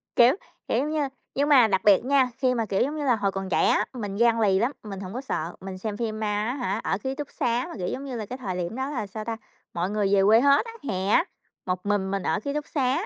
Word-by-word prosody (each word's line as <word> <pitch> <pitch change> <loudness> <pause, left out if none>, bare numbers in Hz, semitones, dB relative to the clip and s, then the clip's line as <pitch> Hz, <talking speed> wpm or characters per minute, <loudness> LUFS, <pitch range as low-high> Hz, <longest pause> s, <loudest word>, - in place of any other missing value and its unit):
Kiểu, 245 +6 +6 0.3
kiểu, - - +1
giống 290 +3 -1
như, 300 -3 0 0.3
nhưng 285 +2 +1
mà 255 -6 +7
đặc 190 -2 +1
biệt 205 +2 +5
nha, 265 -1 +3
khi 255 -2 +2
mà, 230 -2 0
kiểu, 195 -2 0
giống 295 +4 0
như 300 - -3
là, 250 -3 +4
hồi 200 -2 0
còn 195 0 -4
trẻ - - +3
á, - - +3
mình 205 -6 -5
gan 230 +1 +3
lì 195 -3 +3
lắm, 240 +5 +1
mình 200 -3 -7
hổng 190 0 -7
có 250 - -4
sợ. 170 - -3
Mình 190 0 -6
xem 205 +2 -4
phim 220 -2 -3
ma 215 - -1 0.2
á 245 - -1
hả, 245 -5 -2
ở 190 - 0
ký 265 0 -2
túc 290 0 -6
xá 245 -4 0
mà, - - -7
kiểu, 180 -2 -3
giống 275 - -4
như 265 -3 -5
là, 220 -2 -4
cái 255 +5 -6
thời 190 -8 -4
điểm 180 +3 -3
đó 265 +2 -2
là, 240 -8 -3
sao 215 +2 -7
ta, 225 0 -3 0.4
mọi 175 +2 -1
người 205 -1 0
về 195 - +4
quê 220 +3 +6
hết 280 - +4
á, 460 - -7 0.2
hè 190 -2 -1
á, 330 - +4 0.4
một 180 0 -3
mình 200 -2 0
mình 195 -2 -2
ở - - 0
ký 280 +7 -4
túc 300 0 -3
xá, 275 +6 0
225 Hz, 295 wpm, -26 LUFS, 195-265 Hz, 0.4 s, mà